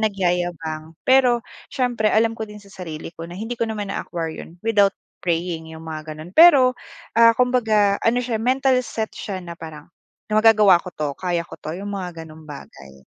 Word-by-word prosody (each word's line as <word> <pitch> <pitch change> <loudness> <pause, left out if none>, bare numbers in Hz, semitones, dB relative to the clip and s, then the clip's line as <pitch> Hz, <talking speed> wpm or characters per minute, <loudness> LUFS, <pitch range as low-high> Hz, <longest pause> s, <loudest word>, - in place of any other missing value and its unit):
nagyayabang, 175 -6 -2
pero 250 -2 +4 0.2
siyempre 240 -4 0
alam 225 +1 +3
ko 220 -1 -6
din 210 0 -10
sa 200 -1 -17
sarili 165 -3 -7
ko 165 -1 -9
na 175 - -9
hindi 225 +4 -5
ko 230 - +1
naman 205 -2 -4
na-acquire 165 -2 -4
'yon 170 - -12
without 205 -3 +3 0.2
praying, 165 -2 -2
'yong 160 0 -10
mga 155 -1 -7
gano'n. 165 +4 -10
Pero, 285 -7 +7 0.4
ah, 230 0 +6
kumbaga 220 -5 +2
ano 245 +2 +1
siya, 225 -3 -2
mental 260 +1 +2
set 220 -3 -4
siya 200 -3 -6
na 170 - -7
parang, 160 -2 -10 0.5
na 215 - +4
magagawa 210 -5 +6
ko 185 - -9
'to, 150 -1 -1
kaya 175 -1 -2
ko - - -12
'to, 155 +3 -5
'yong 200 +1 -6
mga 180 -4 -6
gano'ng 155 0 -14
bagay. 70 - -12
195 Hz, 185 wpm, -22 LUFS, 165-225 Hz, 0.5 s, Pero